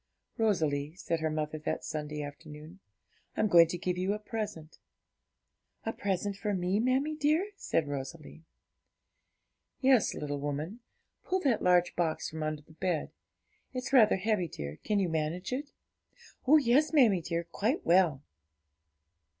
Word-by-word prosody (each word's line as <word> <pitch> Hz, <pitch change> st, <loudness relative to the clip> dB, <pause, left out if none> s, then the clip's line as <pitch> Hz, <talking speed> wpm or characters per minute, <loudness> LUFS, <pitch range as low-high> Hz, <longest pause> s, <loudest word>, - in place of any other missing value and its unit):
'Rosalie,' 155 Hz, -8 st, +1 dB
said 165 Hz, -3 st, -2 dB
her 160 Hz, 0 st, 0 dB
mother 155 Hz, 0 st, -3 dB
that 150 Hz, -, -3 dB
Sunday 150 Hz, -1 st, -4 dB
afternoon, 150 Hz, +4 st, -10 dB, 0.6 s
'I'm -, -, +3 dB
going 170 Hz, -4 st, +7 dB
to 175 Hz, -, -4 dB
give 180 Hz, +1 st, -2 dB
you 190 Hz, +2 st, +1 dB
a -, -, -2 dB
present.' 210 Hz, -7 st, -6 dB, 1.1 s
'A 225 Hz, -, -1 dB
present 200 Hz, 0 st, -2 dB
for 205 Hz, 0 st, -2 dB
me, 185 Hz, +2 st, 0 dB
mammie 260 Hz, +6 st, +1 dB
dear?' 310 Hz, +7 st, +1 dB
said 165 Hz, -, -1 dB
Rosalie. 145 Hz, +3 st, -7 dB, 1.4 s
'Yes, 260 Hz, -4 st, +4 dB
little 145 Hz, -1 st, -3 dB
woman. 145 Hz, -, -4 dB, 0.5 s
Pull 375 Hz, 0 st, 0 dB
that 265 Hz, -8 st, +2 dB
large 180 Hz, -1 st, +3 dB
box 165 Hz, -3 st, -1 dB
from 160 Hz, 0 st, -6 dB
under 155 Hz, -1 st, -3 dB
the 160 Hz, -, -20 dB
bed. 170 Hz, -1 st, -2 dB, 0.6 s
It's 255 Hz, +2 st, -4 dB
rather 225 Hz, -5 st, +6 dB
heavy, 195 Hz, -2 st, 0 dB
dear; 75 Hz, -, -7 dB
can 210 Hz, -, 0 dB
you 195 Hz, -2 st, +2 dB
manage 160 Hz, +6 st, -2 dB
it?' 285 Hz, +3 st, -4 dB, 0.8 s
'Oh 305 Hz, +4 st, +8 dB
yes, 285 Hz, +2 st, +3 dB
mammie 235 Hz, -, +5 dB
dear, 170 Hz, +1 st, -2 dB
quite 215 Hz, -, -2 dB
well.' 170 Hz, -6 st, +3 dB
180 Hz, 145 wpm, -30 LUFS, 155-225 Hz, 1.4 s, Oh